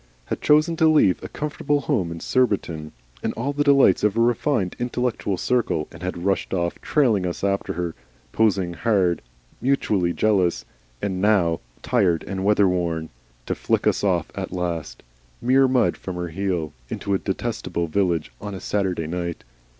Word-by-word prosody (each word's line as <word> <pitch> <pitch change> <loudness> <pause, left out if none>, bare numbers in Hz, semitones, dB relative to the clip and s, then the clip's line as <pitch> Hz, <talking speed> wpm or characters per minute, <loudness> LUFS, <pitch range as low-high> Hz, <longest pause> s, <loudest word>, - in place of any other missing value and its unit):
had - - -4
chosen 155 +3 +4
to 160 0 +4
leave 150 - +4
a - - -6
comfortable 145 -1 -1
home 110 - 0
in 85 - -6
Surbiton, 90 -12 0 0.3
and - - -2
all 135 +5 -2
the 145 +1 +1
delights 140 -11 +5
of 105 +1 +2
a - - +3
refined 115 -4 +1
and 120 - 0
intellectual 120 -6 -1
circle, 100 -8 0
and - - -12
had 90 -1 -4
rushed 95 -1 0
off, 85 -1 -2
trailing 120 -10 +2
us 90 0 -4
after 100 0 0
her, 85 -1 -3 0.4
posing 95 -4 +2
hard, 95 -4 +1 0.4
mutually 105 -9 +1
jealous, 95 -3 +1 0.4
and 95 -2 -1
now 95 -6 +3 0.2
tired 85 -5 +2
and 95 -1 -4
weather 105 0 +4
worn, 85 -3 -1 0.4
to - - -1
flick - - 0
us - - +2
off - - +1
at - - -5
last, 85 -4 -4 0.4
mere 130 +2 +4
mud 130 -1 +2
from 95 - -7
her 90 -1 -4
wheel, 90 -4 -2 0.2
into 100 - -4
this 95 - +1
detestable 85 - -2
village 85 -5 0
beer - - -9
house - - -6
on - - -5
a - - -6
Saturday 95 -3 -1
night! 85 +1 -4
95 Hz, 175 wpm, -23 LUFS, 85-120 Hz, 0.4 s, delights